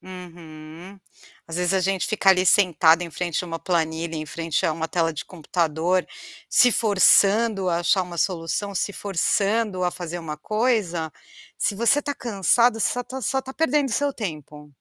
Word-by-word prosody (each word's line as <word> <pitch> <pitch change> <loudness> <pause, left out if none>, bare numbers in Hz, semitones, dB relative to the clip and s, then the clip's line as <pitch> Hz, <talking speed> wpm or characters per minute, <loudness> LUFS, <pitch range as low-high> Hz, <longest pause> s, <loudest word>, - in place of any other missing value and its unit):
Uhum. 170 0 -12 0.5
Às 165 - -6
vezes, 180 +1 0
a 190 - +2
gente 190 0 -1
fica 215 -3 0
ali 185 0 +2
sentado 170 -3 +4
em 170 - -6
frente 175 +1 -3
a - - -7
uma 165 -1 -5
planilha, 165 -1 -2
em 155 -1 -4
frente 165 0 -3
a 160 - +2
uma 160 +1 -3
tela 165 -1 -1
de 155 - -6
computador, 170 +1 -1 0.4
se 250 - +5
forçando 205 -1 +3
a 170 -1 0
achar 185 +2 +2
uma 175 -1 -8
solução, 185 +3 -2
se 205 - -2
forçando 200 +1 -1
a 180 - +1
fazer 175 -1 -6
uma 155 -2 -6
coisa, 195 - -1 0.4
se - - 0
você 235 +6 +3
está 285 0 -3
cansado, 230 +1 +1
você - - +1
só 245 - -3
está 260 +2 -7
só 265 +3 -1
está 265 0 -10
perdendo 300 -2 0
seu 285 +5 0
tempo. 150 - -8
180 Hz, 180 wpm, -23 LUFS, 165-210 Hz, 0.5 s, se